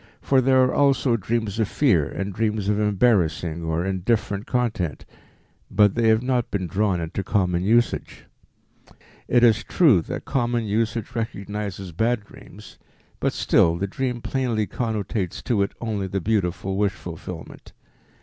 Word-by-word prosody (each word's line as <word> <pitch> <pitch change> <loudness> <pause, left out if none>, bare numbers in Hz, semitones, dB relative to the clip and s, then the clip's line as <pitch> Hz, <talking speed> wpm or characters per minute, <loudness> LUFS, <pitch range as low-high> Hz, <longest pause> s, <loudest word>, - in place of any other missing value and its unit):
For 135 -1 +2
there 130 0 +4
are 130 - +1
also 140 -3 +3
dreams 110 0 -2
of 110 - +2
fear 95 - +2
and 100 0 -4
dreams 105 -1 -1
of 105 0 +1
embarrassing 95 -6 +1
or 80 +2 -1
indifferent 100 +2 -1
content, 115 - -1 0.6
but 105 -1 +4
they 115 -1 +1
have 110 +1 +3
not 125 -2 0
been 95 -3 -2
drawn 95 +1 0
into 85 +4 -4
common 90 -3 0
usage. 120 +4 0 1.0
It 120 0 +3
is 115 -2 +5
true 140 - +4
that - - -6
common 120 -2 0
usage 110 +2 -1
recognizes 105 -4 -4
"bad" 110 +5 0
dreams, - - -14 0.4
but - - +1
still 85 0 +3
the 95 - -1
dream 125 +4 -3
plainly 120 -5 -1
connotates 110 -5 -3
to 115 -5 +1
it 100 - 0
only 105 -4 -2
the 95 +1 -2
beautiful 95 -1 -1
wish 100 -1 +1
fulfillment. 85 -3 -9
105 Hz, 150 wpm, -23 LUFS, 95-120 Hz, 1.0 s, is